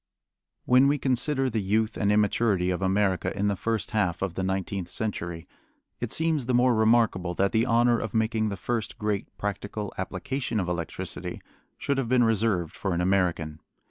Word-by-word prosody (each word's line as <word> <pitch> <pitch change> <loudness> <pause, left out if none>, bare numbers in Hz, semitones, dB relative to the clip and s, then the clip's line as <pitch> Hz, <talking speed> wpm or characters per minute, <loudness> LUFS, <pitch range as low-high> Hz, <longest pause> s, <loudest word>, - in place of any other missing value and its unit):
When 130 +2 +5
we 145 +1 +2
consider 135 +1 +1
the 115 -4 -1
youth 110 +3 0
and 100 -1 +1
immaturity 105 -3 +2
of 90 - -2
America 95 0 +1
in 100 +1 +1
the 100 - 0
first 115 +2 -2
half 90 -5 0
of 95 -3 -2
the 95 - -3
nineteenth 95 -1 -2
century, 85 -5 -4 0.5
it - - -4
seems 160 -6 +1
the 125 - +2
more 125 0 +4
remarkable 110 -6 +2
that 100 +2 +1
the 115 +2 +2
honor 120 0 +3
of 110 -1 -5
making 110 -1 +1
the 100 - -4
first 110 +3 -3
great 105 -2 -2
practical 105 0 -4
application 115 +6 -3
of 90 - -2
electricity 85 -3 -4 0.4
should 140 -1 -1
have 120 -4 -2
been 125 -1 +4
reserved 110 -7 +1
for 95 -3 -2
an - - -1
American. 90 -5 0
105 Hz, 175 wpm, -26 LUFS, 95-120 Hz, 0.5 s, When